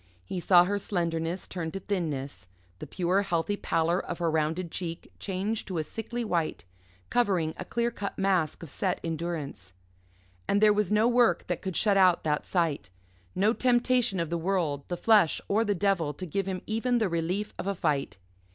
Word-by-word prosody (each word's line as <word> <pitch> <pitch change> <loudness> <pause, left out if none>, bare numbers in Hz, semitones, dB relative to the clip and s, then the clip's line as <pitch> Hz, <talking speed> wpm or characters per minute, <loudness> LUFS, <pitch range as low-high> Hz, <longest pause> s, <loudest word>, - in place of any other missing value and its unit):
He 180 - -4
saw 175 0 +6
her 200 +3 -1
slenderness 170 -2 -2
turn 170 -3 -4
to 195 - -3
thinness, 150 - -3 0.3
the - - -7
pure, 185 +2 +1
healthy 195 +1 0
pallor 170 -2 +1
of - - -5
her 170 -2 0
rounded 160 +2 -1
cheek 170 -2 -5
change 200 +3 -2
to 185 - -4
a 160 - 0
sickly 230 +7 -5
white, 170 - -1 0.5
covering 185 -10 +1
a - - -6
clear 235 0 -1
cut 205 -3 -5
mask 185 -5 +1
of 155 - -8
set 185 -2 -1
endurance. 160 - -4 0.7
And 200 - +3
there 210 0 +6
was 205 -1 0
no 215 +2 +4
work 240 -1 +3
that - - -3
could 190 -3 -3
shut 205 -3 +3
out 185 -2 +5
that 150 -1 -1
sight 155 - 0 0.5
no 205 +4 +3
temptation 245 -4 +2
of 165 -1 -2
the 170 - 0
world, 165 -6 -1
the 175 - -3
flesh, 210 -5 +4
or 215 +3 +2
the 205 -2 0
devil 175 -6 +1
to 185 - -6
give 195 +3 -2
him 185 -1 -3
even 235 +3 0
the 220 -3 +2
relief 175 +4 -2
of - - -4
a 200 - 0
fight. 140 - -1
185 Hz, 190 wpm, -28 LUFS, 165-205 Hz, 0.7 s, saw